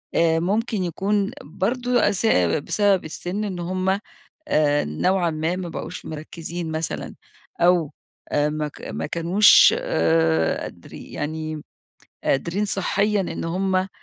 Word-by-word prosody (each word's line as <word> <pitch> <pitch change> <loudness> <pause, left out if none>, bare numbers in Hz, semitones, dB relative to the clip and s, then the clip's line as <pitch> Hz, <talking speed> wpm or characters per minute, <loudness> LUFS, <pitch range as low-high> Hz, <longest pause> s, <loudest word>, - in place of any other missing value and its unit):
آآ 165 -1 +3
ممكن 205 +3 0
يكون 195 +3 0
برضه 245 - +1
أس 200 +3 -1 0.4
بسبب 205 -3 +2
السن 180 +6 -4
إن 190 -4 -4
هم 185 +2 -1 0.6
آآ 145 -1 +2
نوعًا 175 - +1
ما 160 +2 -1
بقوش - - -7
مركزين 160 +2 -6
مثلًا، 160 0 -4 0.5
أو 175 -3 +3 0.4
ما 150 +1 0
ك - - -14
ما - - -4
كانوش 175 +6 +6
آآ 80 0 +2
قادري - - -10
يعني 155 0 -4 0.6
قادرين 170 +9 0
صحيًا 205 +1 0
إن 185 - -4
هم 185 +2 0
175 Hz, 115 wpm, -23 LUFS, 155-195 Hz, 0.6 s, كانوش